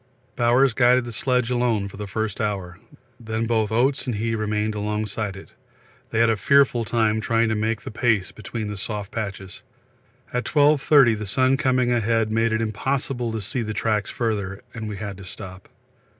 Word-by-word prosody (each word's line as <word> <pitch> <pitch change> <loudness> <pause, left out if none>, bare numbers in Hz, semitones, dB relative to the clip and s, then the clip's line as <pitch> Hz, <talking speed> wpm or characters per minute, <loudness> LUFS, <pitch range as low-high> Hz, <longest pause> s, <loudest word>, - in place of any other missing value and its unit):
Bowers 125 +2 +3
guided 125 0 +4
the 120 - -6
sledge 125 +1 +1
alone 120 -5 +1
for 100 - -11
the 105 0 -5
first 110 +2 -3
hour, 95 -4 -3 0.4
then 110 -1 -3
both 110 -2 0
Oates 130 +5 +1
and 120 - -1
he 115 +2 -1
remained 105 0 -1
alongside 105 -1 -3
it; - - -12 0.6
they 115 - -3
had 115 0 +4
a - - +2
fearful 135 +1 +3
time 110 -1 +1
trying 115 +1 +1
to - - +1
make 110 +1 -1
the - - -6
pace 110 -5 +1
between 110 +1 -6
the 105 0 -5
soft 105 0 -5
patches. 100 -3 -6 0.7
At 125 0 -1
12.30 145 -5 +4
the 105 - -5
sun 130 +6 +3
coming 130 -4 +2
ahead 115 -1 +1
made 115 +1 +2
it 110 0 +1
impossible 120 +2 -2
to 110 -1 -3
see 120 +6 -3
the 110 -1 -4
tracks 105 -1 0
further, 100 -5 -3
and 110 -2 -5
we 105 - -5
had 100 -2 -6
to 100 - -10
stop. 95 0 -9
110 Hz, 185 wpm, -23 LUFS, 105-120 Hz, 0.7 s, guided